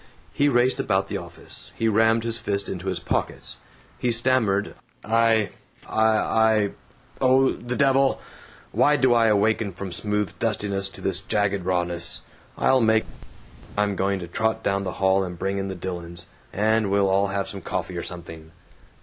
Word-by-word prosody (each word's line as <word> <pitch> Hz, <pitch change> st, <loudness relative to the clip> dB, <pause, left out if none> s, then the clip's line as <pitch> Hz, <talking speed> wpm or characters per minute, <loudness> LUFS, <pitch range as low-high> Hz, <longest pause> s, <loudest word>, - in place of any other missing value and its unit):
He 145 Hz, 0 st, +2 dB
raced 125 Hz, 0 st, +2 dB
about -, -, 0 dB
the -, -, -2 dB
office; -, -, -12 dB
he 115 Hz, -, 0 dB
rammed 110 Hz, +1 st, +3 dB
his 115 Hz, -1 st, -1 dB
fists 100 Hz, -3 st, -2 dB
into 95 Hz, 0 st, -5 dB
his 95 Hz, -2 st, -1 dB
pockets. -, -, -3 dB, 0.4 s
He 125 Hz, -, +1 dB
stammered, 115 Hz, -4 st, +2 dB, 0.3 s
"I 115 Hz, -1 st, +2 dB, 0.4 s
I 110 Hz, 0 st, +2 dB
I 110 Hz, -2 st, +2 dB, 0.5 s
Oh, 130 Hz, 0 st, +4 dB
the 120 Hz, +1 st, -5 dB
devil! 135 Hz, 0 st, +3 dB, 0.5 s
Why 150 Hz, -, +3 dB
do 130 Hz, -4 st, +3 dB
I 115 Hz, -1 st, +4 dB
awaken 105 Hz, -1 st, +1 dB
from 95 Hz, +1 st, -7 dB
smooth 105 Hz, +2 st, -1 dB
dustiness 100 Hz, -3 st, 0 dB
to -, -, -11 dB
this 95 Hz, -2 st, -1 dB
jagged 100 Hz, -2 st, 0 dB
rawness? 90 Hz, -2 st, +1 dB, 0.3 s
I'll 130 Hz, -1 st, +3 dB
make 110 Hz, -1 st, +3 dB, 0.7 s
I'm 105 Hz, -1 st, +1 dB
going 100 Hz, +1 st, 0 dB
to 90 Hz, -, -6 dB
trot 110 Hz, +6 st, -1 dB
down 100 Hz, 0 st, 0 dB
the 90 Hz, -, -3 dB
hall 95 Hz, 0 st, +2 dB
and 90 Hz, -2 st, -6 dB
bring 95 Hz, +3 st, -2 dB
in 95 Hz, -, -3 dB
the 95 Hz, -, -5 dB
Dillons, 85 Hz, -1 st, -7 dB, 0.3 s
and 110 Hz, 0 st, +1 dB
we'll 100 Hz, 0 st, +2 dB
all 95 Hz, +1 st, +2 dB
have 100 Hz, 0 st, -3 dB
coffee 90 Hz, 0 st, -4 dB
or 85 Hz, -, -3 dB
something." 85 Hz, -3 st, -8 dB
100 Hz, 165 wpm, -24 LUFS, 95-115 Hz, 0.7 s, Oh